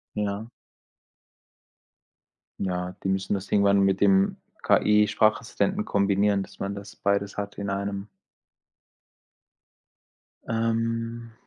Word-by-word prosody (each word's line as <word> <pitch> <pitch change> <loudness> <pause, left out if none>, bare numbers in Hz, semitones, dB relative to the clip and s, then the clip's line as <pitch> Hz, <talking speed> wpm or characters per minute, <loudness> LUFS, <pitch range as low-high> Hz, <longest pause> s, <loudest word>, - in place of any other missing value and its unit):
Ja. 105 +2 -3 2.1
Ja, 90 -1 -2
die 95 - -2
müssen 95 +1 -1
das 95 0 -5
irgendwann 100 -1 +4
mit 95 0 +2
dem 95 -1 +4 0.3
KI-Sprachassistenten 110 - +2
kombinieren, 100 0 +2
dass - - -12
man 100 +1 -3
das 100 +1 -9
beides 100 0 -1
hat 100 0 -4
in 100 -1 -4
einem. 100 0 -3 2.4
Ähm. 115 0 -1
100 Hz, 95 wpm, -26 LUFS, 100-110 Hz, 2.4 s, irgendwann